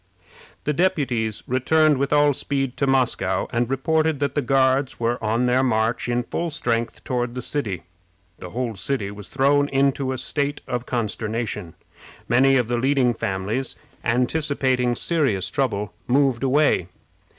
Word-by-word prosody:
The 150 - 0
deputies 135 - 0
returned 150 +3 +3
with 140 0 0
all 145 -1 +4
speed 135 -1 -2
to 140 - +1
Moscow, 135 -2 +1
and 120 0 0
reported 155 +3 +1
that 140 -1 -1
the 145 - +1
Guards 130 +1 +2
were 115 0 -1
on 115 +3 +1
their 125 +1 +3
march 115 -1 0
in 120 0 0
full 170 +7 -3
strength 120 -6 -2
toward 120 -1 -2
the 125 - -3
city. 105 - -3 0.6
The 90 - -8
whole 120 +2 -3
city 105 -2 -2
was 105 -1 -9
thrown 145 +1 +2
into 135 -1 +1
a 130 - -3
state 145 +3 -2
of 125 0 -3
consternation. 110 -5 -3 0.5
Many 135 +2 +4
of 125 -3 +1
the 120 0 0
leading 130 -1 +2
families, 110 +4 -3 0.3
anticipating 125 0 +1
serious 135 - 0
trouble, 105 -7 -1
moved 135 -2 +2
away. 135 - +2
130 Hz, 150 wpm, -23 LUFS, 115-140 Hz, 0.6 s, all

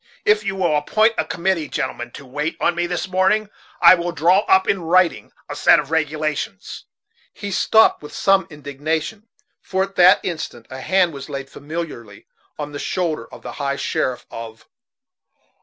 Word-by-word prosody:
If 210 0 +3
you 195 -2 -2
will 175 -5 +1
appoint 215 +10 +2
a 160 - +1
committee, 170 -1 -1
gentlemen, 120 -2 -4
to 140 - -10
wait 150 +5 -3
on 175 - +2
me 175 0 -1
this 175 +1 -3
morning, 190 +3 +1 0.3
I - - +9
will 175 -1 -1
draw 170 +4 +3
up 190 0 +4
in 195 - +1
writing 175 +1 +2 0.2
a - - -6
set - - +5
of 140 - -3
regulations 155 - -3 0.2
' - - -38
He 200 - -6
stopped, 220 +3 +4
with 150 - -10
some 195 -1 +2
indignation, 155 +8 -4 0.3
for 190 0 -1
at 195 0 -6
that 180 +2 +7
instant 155 -9 -5
a 130 0 -7
hand 185 -1 +2
was 140 0 -9
laid 135 -1 -6
familiarly 145 -8 -7 0.3
on 150 -1 -5
the 145 - -6
shoulder 170 -4 -2
of - - -12
the - - -6
High 140 0 -1
Sheriff 130 -2 -2
of 115 -1 -9
165 Hz, 175 wpm, -20 LUFS, 145-190 Hz, 0.3 s, I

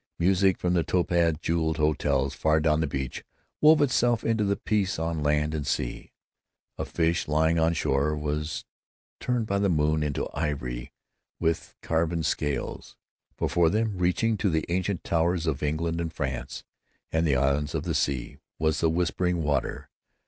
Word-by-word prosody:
Music 95 +1 +3
from 90 0 0
the 85 - +3
topaz 85 -2 +2
jeweled 80 -1 0
hotels 70 -3 +1
far 80 +3 +2
down 75 0 +2
the 80 - 0
beach 65 -2 -4 0.4
wove 155 0 +7
itself 120 -4 +2
into 115 -2 +1
the 100 0 +1
peace 100 -3 0
on 80 -1 -2
land 75 +1 +1
and 75 -2 -3
sea. - - -3 0.7
A - - -1
fish 85 0 0
lying 80 +2 +2
on 80 +1 +2
shore 70 +1 +1
was 75 +1 -3 0.5
turned 125 -2 0
by 100 -2 0
the 100 -1 +2
moon 75 -1 +2
into 75 -2 -1
ivory 65 -6 -3 0.5
with 80 0 -1
carven 80 0 0
scales. 75 -1 -2 0.4
Before 85 -2 +2
them, 110 +2 0
reaching 105 +5 +1
to 100 - +1
the 80 -2 0
ancient 95 +1 -1
towers 85 +1 +1
of 75 -3 -1
England 80 +3 -1
and 80 -1 -3
France 65 -6 -4 0.5
and 80 +1 +1
the 70 - +3
islands 70 +2 +1
of - - -1
the - - -2
sea, 65 -4 -1 0.2
was 80 -1 +1
the 80 - +3
whispering 90 0 0
water. 70 -3 -1
80 Hz, 165 wpm, -27 LUFS, 75-90 Hz, 0.7 s, wove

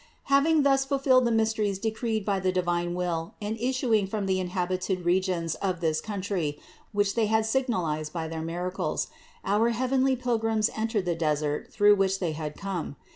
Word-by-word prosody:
706. - - -10
Having 305 +2 +4
thus 270 -1 +4
fulfilled 270 -2 +3
the 235 - +2
mysteries 220 -3 +1
decreed 220 0 -2
by 200 -2 +1
the 185 0 +1
divine 175 -1 0
will 170 -2 -2
and 210 +1 -3
issuing 240 -4 +1
from 205 0 -2
the 190 -1 +1
inhabited 185 0 -2
regions 175 -2 +1
of 185 -3 -1
this 160 -2 0
country, 190 -8 -3 0.3
which 205 -1 +1
They 225 -2 +1
had 220 0 +2
signalized 185 - -1
by 165 -1 -3
their 160 0 -5
miracles, 175 +3 -2 0.4
our 215 +4 +3
heavenly 260 +3 +1
Pilgrims 225 -3 0
entered 220 -3 -1
the 175 - +1
desert 150 -2 -1
through 205 0 +5
which 195 0 +2
They 175 -4 -1
had 155 -1 -5
come. 190 -7 -4
195 Hz, 175 wpm, -27 LUFS, 175-225 Hz, 0.4 s, through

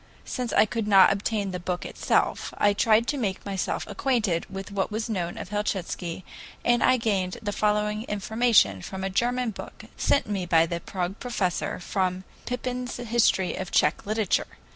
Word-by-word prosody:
Since 250 -3 -3
I - - +6
could 220 0 -3
not 195 -1 +7
obtain 200 0 -2
the 180 - -4
book 180 0 -3
itself, - - 0
I 205 0 +4
tried 220 +2 +3
to 285 +2 -1
make 195 -6 -2
myself 195 -2 -2
acquainted 220 -11 0
with 195 +1 -7
what 195 -1 -1
was 220 +2 -3
known 175 -4 -2
of - - -6
Helchitsky, 190 -4 -3 0.4
and 240 0 +3
I 255 - +5
gained 195 -6 -1
the 210 -2 -3
following 210 +1 0
information 210 - +2
from 190 - -6
a 195 - -2
German 245 +3 0
book - - -10
sent 280 - +2
me 195 -4 -3
by 165 -1 +5
the 170 0 -3
Prague 180 +2 -4
professor 200 -8 -1
and - - -7
from 185 -1 -1 0.2
Pypin's 250 0 -3
history 235 -6 +2
of 190 -1 -5
Tsech 150 +6 +2
literature. 215 -2 +1
205 Hz, 175 wpm, -26 LUFS, 185-230 Hz, 0.4 s, not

